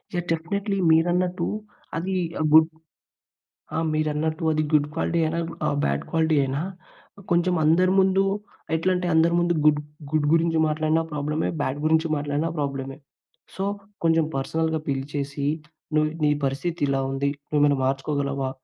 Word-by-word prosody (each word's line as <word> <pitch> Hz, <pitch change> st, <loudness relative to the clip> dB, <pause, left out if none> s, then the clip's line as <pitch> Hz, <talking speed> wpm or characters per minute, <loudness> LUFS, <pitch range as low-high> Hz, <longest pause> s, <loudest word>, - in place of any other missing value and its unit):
Yeah! 175 Hz, -1 st, -1 dB
Definitely 195 Hz, +5 st, -1 dB
మీరన్నట్టు 175 Hz, +3 st, +2 dB, 0.5 s
అది 185 Hz, +3 st, -2 dB, 0.4 s
good 160 Hz, +1 st, +7 dB, 1.1 s
ఆ! -, -, 0 dB, 0.2 s
మీరన్నట్టు 155 Hz, +2 st, -1 dB
అది 155 Hz, 0 st, +1 dB
గుడ్ 150 Hz, -1 st, +3 dB
క్వాలిటీ 170 Hz, +1 st, 0 dB
అయినా? 160 Hz, +2 st, -1 dB, 0.3 s
ఆహ్, -, -, +1 dB
బ్యాడ్ 70 Hz, 0 st, 0 dB
క్వాలిటీ 160 Hz, -2 st, +2 dB
అయినా? 135 Hz, +2 st, -2 dB, 0.7 s
కొంచెం 175 Hz, +1 st, +3 dB
అందరి 175 Hz, +4 st, +4 dB
ముందు, 190 Hz, 0 st, +4 dB, 0.5 s
ఎట్లంటే 180 Hz, +2 st, 0 dB
అందరి 165 Hz, +1 st, +4 dB
ముందు 175 Hz, 0 st, +2 dB
గుడ్, 150 Hz, -1 st, +5 dB, 0.3 s
గుడ్ 155 Hz, -1 st, +2 dB
గురించి 165 Hz, 0 st, +2 dB
మాట్లాడినా 155 Hz, +1 st, +1 dB
ప్రాబ్లమే. 150 Hz, +2 st, -1 dB
బ్యాడ్ 135 Hz, 0 st, -1 dB
గురించి 160 Hz, +1 st, +3 dB
మాట్లాడినా 145 Hz, +2 st, -1 dB
ప్రాబ్లమే. 135 Hz, -2 st, -3 dB, 0.6 s
సో 190 Hz, -, -3 dB, 0.4 s
కొంచెం 165 Hz, -1 st, +3 dB
పర్సనల్‌గా 160 Hz, +3 st, -1 dB
పిలిచేసి, 140 Hz, +1 st, -3 dB, 0.5 s
"నువ్వు 155 Hz, 0 st, +3 dB
నీ 150 Hz, -, +4 dB
పరిస్థితి 155 Hz, +5 st, -2 dB
ఇలా 135 Hz, -1 st, +1 dB
ఉంది. 140 Hz, +1 st, 0 dB, 0.2 s
నువ్వు 150 Hz, -1 st, +2 dB
ఏమైనా 145 Hz, -1 st, +4 dB
మార్చుకోగలవా? 135 Hz, 0 st, -1 dB
155 Hz, 135 wpm, -24 LUFS, 145-165 Hz, 1.1 s, గుడ్